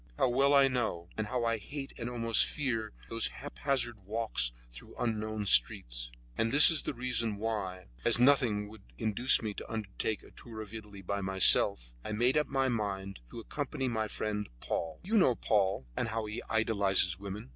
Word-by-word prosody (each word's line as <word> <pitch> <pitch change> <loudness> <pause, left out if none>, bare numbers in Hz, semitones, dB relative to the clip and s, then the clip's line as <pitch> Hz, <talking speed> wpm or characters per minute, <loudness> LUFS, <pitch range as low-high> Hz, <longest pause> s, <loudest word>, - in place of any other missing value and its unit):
How 130 - +2
well 135 +3 +3
I 140 -1 +6
know, 110 -10 -2
and 110 -1 -3
how 125 0 -2
I 115 -1 0
hate 140 +5 -7
and 120 0 -4
almost 115 -1 +4
fear, 115 -7 -3 0.2
those 115 0 -1
haphazard 135 -5 -3
walks 105 - -1 0.2
through - - -13
unknown 110 -2 -3
streets; - - +2 0.3
and 115 0 0
this 145 +4 +9
was 160 - +3
the - - -5
reason 120 -4 -1
why, 100 -4 -4 0.2
as 120 - +3
nothing 120 -5 +3
would 110 +1 -13 0.2
induce 110 - +2
me 105 -2 -3
to - - -9
undertake 110 0 -3
a - - -17
tour 115 -2 -10
in 105 0 -14
Italy 105 -3 -9
by 100 +3 -3
myself, 95 -10 +5
I 110 - -5
made 120 +4 +2
up 150 -2 +1
my 135 -1 0
mind 100 -5 -4
to - - -9
accompany 135 +2 -4
my 110 -3 -2
friend 105 -1 -4
Paul 80 +4 -4
Pavilly. 205 - -6
You 220 - +5
know 130 -10 +3
Paul, 95 - 0
and - - -2
how 110 0 -3
he 105 +1 -6
idealizes 100 -5 +2
women. 100 -5 -8
110 Hz, 190 wpm, -30 LUFS, 100-125 Hz, 0.3 s, this